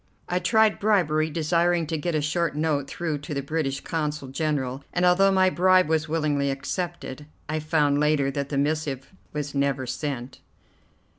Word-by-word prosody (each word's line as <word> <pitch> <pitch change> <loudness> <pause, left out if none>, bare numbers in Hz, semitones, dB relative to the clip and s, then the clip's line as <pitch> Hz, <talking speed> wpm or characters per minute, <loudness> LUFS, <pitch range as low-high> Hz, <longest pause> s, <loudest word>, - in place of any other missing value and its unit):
I 180 - 0
tried 220 +1 +3
bribery, 160 -7 +2
desiring 170 +2 +1
to 160 +1 -3
get 160 +2 -2
a 150 - 0
short 165 +2 0
note 150 -3 0
through 160 -4 -3
to 145 +1 -6
the 140 - -2
British 140 -2 -2
Consul 150 -4 -3
General, 135 -2 -2
and, 180 0 +1
although 190 +2 +5
my 185 -1 +4
bribe 185 +1 +4
was 160 0 0
willingly 150 -3 0
accepted, 150 0 -4 0.2
I 155 +1 -1
found 150 -2 +2
later 150 -2 +2
that 140 0 -3
the 140 - -2
missive 145 0 -1 0.2
was 150 -1 -4
never 140 -2 0
sent. 130 -1 -5
155 Hz, 165 wpm, -25 LUFS, 140-170 Hz, 0.2 s, although